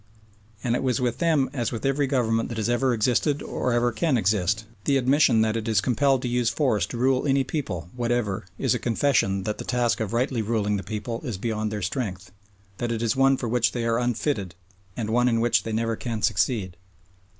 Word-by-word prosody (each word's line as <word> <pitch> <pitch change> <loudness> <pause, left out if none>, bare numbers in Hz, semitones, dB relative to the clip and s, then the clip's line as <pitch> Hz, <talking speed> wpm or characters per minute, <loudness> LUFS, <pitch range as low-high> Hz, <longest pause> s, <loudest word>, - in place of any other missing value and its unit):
And 120 -1 +1
it - - -1
was 130 -4 0
with 120 -2 -1
them 155 -5 +2
as 120 -5 -2
with 115 0 -5
every 135 +1 +1
government 115 -4 0
that 115 - -5
has 110 +1 -1
ever 125 +2 +2
existed 125 +5 +1
or 125 - -2
ever 120 0 +2
can 130 +4 +1
exist, 105 +1 +1 0.2
the 140 - +3
admission 130 -3 +4
that 110 0 +1
it 115 0 -3
is 110 -2 +3
compelled 135 +1 +2
to - - -1
use 120 -1 +1
force 115 -5 +1
to 120 - -6
rule 130 +3 +2
any 135 0 +3
people 125 - -4
whatever 120 -5 -1
is - - +1
a - - -1
confession 115 -6 +1
that 105 +1 -3
the - - -4
task 120 -2 0
of 110 -3 -2
rightly 120 0 0
ruling 105 -2 0
that 95 -1 -7
people 110 +2 -4
is 115 -7 -4
beyond 110 0 -2
their 105 -2 -4
strength, 100 -3 -4 0.5
that 120 -1 -2
it 115 0 -2
is 115 - +1
one 135 0 +4
for 120 - -3
which 115 -3 +1
they 120 -2 -2
are 115 0 +1
unfitted 120 - -1 0.4
and 110 -2 -2
one 120 +2 +3
in 115 -1 +1
which 120 +1 +3
they 115 - -5
never 115 +1 0
can 115 -2 -4
succeed. 95 -2 0
115 Hz, 215 wpm, -25 LUFS, 110-130 Hz, 0.5 s, admission